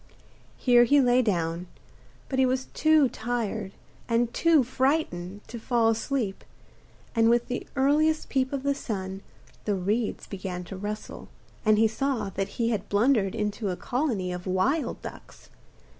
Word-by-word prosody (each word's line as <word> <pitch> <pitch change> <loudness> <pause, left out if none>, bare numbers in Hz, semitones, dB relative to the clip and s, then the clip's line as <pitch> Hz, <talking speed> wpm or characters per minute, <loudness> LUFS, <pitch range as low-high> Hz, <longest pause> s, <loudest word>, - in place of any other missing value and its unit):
Here 245 -2 +5
he 285 +4 +5
lay 250 -1 +4
down, 175 -5 -1 0.6
but 265 - -2
he 265 - +5
was 260 +1 0
too 310 -3 +4
tired 225 -4 -3 0.4
and 235 0 +1
too 330 -5 +4
frightened 240 - -1
to 235 - -7
fall 230 0 +2
asleep, 225 -2 -1 0.7
and 225 -1 +4
with 240 0 +2
the 250 - -4
earliest 300 +3 +2
peep 260 -1 0
of 275 -2 -3
the 280 0 +2
sun 195 -7 -5 0.4
the 205 - +1
reeds 205 +5 -1
began 185 -2 -5
to 185 - -8
rustle, 205 +3 -6 0.4
and 215 -1 +4
he 220 +1 +5
saw 225 -3 -2
that 195 +1 -2
he 230 -1 +1
had 210 -4 -3
blundered 210 -2 +2
into 210 -1 -2
a 180 - -3
colony 240 -9 -1
of 180 +1 -6
wild 240 - 0
ducks. - - -11
230 Hz, 155 wpm, -27 LUFS, 195-260 Hz, 0.7 s, Here